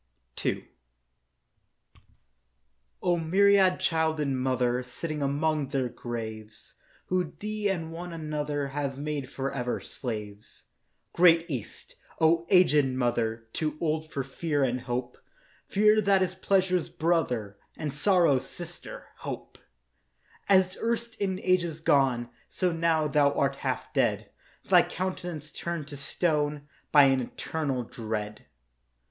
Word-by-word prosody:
II - - -1 2.4
O 175 -1 +3
myriad 190 +3 +4
childed 160 -2 +1
Mother, 130 -2 +1
Sitting 150 +5 -5
among 145 +1 0
their 130 -2 -1
graves 110 -3 -7 0.3
Who 180 -3 -1
thee 210 -1 -2
and 165 -4 -2
one 175 +2 -6
another 150 -3 -3
Have 140 -1 -3
made 145 -2 -3
for 135 0 -3
ever 125 -2 -2
slaves, 105 -4 -7 0.5
Great 170 -1 +6
East; 130 - -6 0.2
O 165 +1 +3
aged 180 -6 +6
Mother, 120 -3 -1
Too 155 -1 -2
old 155 -1 -1
for 135 - -2
Fear 145 +2 -1
and 125 -1 0
Hope— 125 0 -4 0.5
Fear 215 +2 +4
that 195 -2 +4
is 185 0 -2
Pleasure's 185 -2 +1
brother, 125 - 0 0.2
And 150 -3 -3
Sorrow's 165 -4 +3
sister, - - -8
Hope— - - -7 0.9
As 185 -1 +4
erst 235 0 -1
in 190 -2 0
ages 175 -4 +1
gone, 130 -6 +2 0.2
So 180 -2 0
now, 165 -2 +2
thou 145 0 +3
art 140 -1 0
half - - -3
dead, - - +1 0.3
Thy - - +6
countenance 175 -4 -4
turned 170 -4 -4
to 145 - -7
stone 145 0 -1 0.2
By 145 -1 +8
an 135 -1 +4
eternal 135 +1 -3
dread. 110 -3 -5
150 Hz, 120 wpm, -28 LUFS, 130-175 Hz, 2.4 s, By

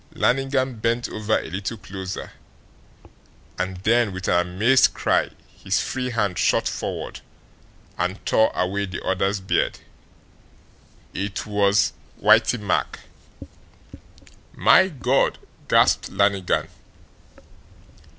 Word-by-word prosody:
Lannigan 135 -1 0
bent 120 +2 0
over 110 0 0
a - - -5
little 95 +5 -4
closer, 95 -2 -7 1.3
and 95 0 -2
then, 115 0 +3
with 95 0 -6
an 90 0 +2
amazed 115 +9 +3
cry, - - +1 0.3
his - - +1
free 130 -1 -3
hand 105 -7 -1
shot - - +2
forward - - -5 0.8
and 90 +3 -1
tore 110 - +3
away 100 +2 -1
the 95 - -7
other's 95 +2 0
beard. 95 - 0 1.4
IT 100 +1 -4
WAS 105 -1 +2 0.2
WHITEY 125 - +4
MACK! 105 -3 -2 1.5
"My 190 - +5
God!" 135 -5 0 0.3
gasped - - +3
Lannigan. 100 -2 +1
100 Hz, 100 wpm, -23 LUFS, 95-120 Hz, 1.5 s, My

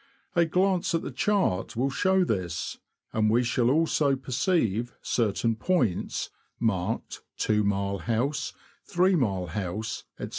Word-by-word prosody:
A 170 -1 +5
glance 180 +1 +1
at 165 - -1
the - - -4
chart 130 - 0
will 130 +4 0
show 190 +5 +3
this, 90 - -2 0.3
and 110 -1 +2
we 120 +3 +3
shall 120 0 +2
also 150 -1 +3
perceive 125 - 0
certain 115 0 +1
points, 120 - 0 0.3
marked 110 -1 -1 0.2
"2 105 -1 +2
mile 100 -1 0
house," 120 +6 -1 0.4
''3 185 +2 +3
mile 95 -8 0
house, 100 +5 -4
''' - - -39
&c. - - -4
120 Hz, 140 wpm, -27 LUFS, 100-160 Hz, 0.4 s, A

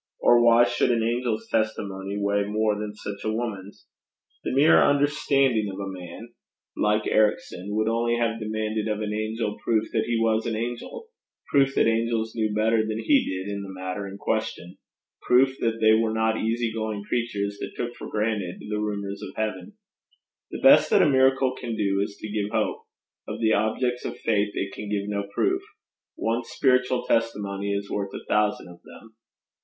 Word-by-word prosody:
Or 120 0 +5
why 120 0 +6
should - - +1
an 115 -2 +2
angel's 120 -1 -1
testimony 100 -3 -2
weigh 100 0 +1
more 105 +1 +1
than 105 0 -5
such 100 -1 -7
a 110 - 0
woman's? 105 -4 -5 0.6
The - - -2
mere 140 +5 +5
understanding 140 -6 +2
of 95 - -8
a 100 - -4
man 90 +5 -9 0.5
like 105 +1 +1
Ericson 105 -2 0
would 110 0 +1
only 115 +1 +1
have 115 -1 0
demanded 110 0 -2
of 105 -1 -1
an 105 0 -2
angel 110 0 -3
proof 110 -1 0
that 110 - +1
he 120 -1 0
was 110 0 +1
an 115 - -1
angel, 120 - -5 0.4
proof 135 -1 +3
that - - +4
angels 115 0 0
knew 110 -2 -1
better 110 +1 +2
than 110 0 -3
he 275 - +2 0.2
did 100 - -4
in 100 - -4
the 100 - -8
matter 95 +1 -5
in 100 0 -8
question, 90 -2 -3 0.4
proof 130 +2 +4
that 115 -1 0
they 110 0 +5
were 110 0 +2
not 110 0 +1
easy 115 0 0
going 110 -2 -3
creatures 105 -3 -2
that - - -6
took 120 0 -3
for - - -8
granted 105 -4 -2
the 105 - -1
rumours 100 -1 -3
of - - -8
heaven. 105 -4 -3 0.8
The - - -6
best - - +7
that - - +5
a - - +4
miracle 130 -1 +3
can 120 -3 -5
do 100 -2 +1
is 100 - -7
to - - -6
give 105 -1 -1
hope; - - -1 0.4
of 105 +1 -5
the 110 -1 +3
objects 125 +4 0
of - - -4
faith 105 -2 +1
it 100 0 -3
can 105 - -7
give 100 -1 -2
no 100 -1 -3
proof; 375 - +1 0.5
one 115 +2 -1
spiritual 125 0 +1
testimony 100 -3 -1
is 100 0 -3
worth 100 -1 -3
a - - -8
thousand 105 -2 +1
of 85 0 -14
them. 110 0 -15
110 Hz, 185 wpm, -25 LUFS, 100-115 Hz, 0.8 s, best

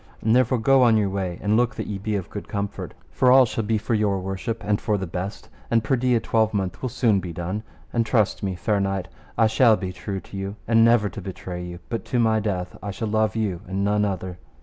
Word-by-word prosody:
And 110 +1 +3
therefore 130 0 +3
go 135 +4 +4
on 115 -3 +5
your 105 -2 +1
way, 95 -3 -2
and 105 +1 +2
look 120 0 +2
that - - -4
ye 100 -2 -4
be 105 +2 -2
of 95 -3 -4
good 100 - -6
comfort, 100 0 -4 0.2
for 125 - +3
all 130 0 +8
shall 115 -1 -3
be 110 +1 +1
for 105 - -2
your 105 -3 +1
worship 95 +5 -4
and 105 0 0
for 105 -2 +1
the 95 - -3
best, 90 +4 -5 0.2
and 115 -1 +2
perdy 125 0 +2
a - - +3
twelvemonth 105 -5 0
will 130 - -2
soon 110 -4 +2
be 90 -2 -6
done, 90 +5 -4 0.3
and 115 - +2
trust 110 -2 +1
me, 95 -2 -2
fair 105 +3 0
knight, 95 -2 -2 0.3
I 115 - +5
shall 110 0 +5
be 95 -2 -4
true 95 +2 -5
to 100 - -13
you, 95 +1 -4
and 115 0 +5
never 115 -2 +4
to - - -8
betray 90 -2 -6
you, 90 0 -7
but 115 - -3
to 125 - -1
my 110 -1 +3
death 95 -4 -3
I 100 - -5
shall 105 +3 -3
love 110 -1 +1
you 100 -6 -1
and 95 +1 -2
none 105 +1 +2
other. 95 -3 -3
105 Hz, 245 wpm, -24 LUFS, 95-115 Hz, 0.3 s, all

